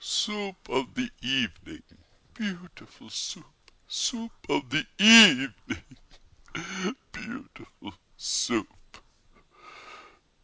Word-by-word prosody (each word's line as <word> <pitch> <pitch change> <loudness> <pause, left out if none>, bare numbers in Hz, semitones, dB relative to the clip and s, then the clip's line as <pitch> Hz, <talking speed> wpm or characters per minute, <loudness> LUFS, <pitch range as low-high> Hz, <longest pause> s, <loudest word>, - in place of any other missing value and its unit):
Soup 205 -3 -4
of 130 0 -4
the 250 -1 -4
evening, 125 -7 -3 0.5
beautiful 185 -6 -10
Soup! - - -9 0.2
Soup 230 -2 -4 0.2
of 140 - -1
the 155 +3 0
evening, 205 - +7 1.3
beautiful - - -13 0.2
Soup! - - -4
195 Hz, 70 wpm, -26 LUFS, 135-225 Hz, 1.3 s, evening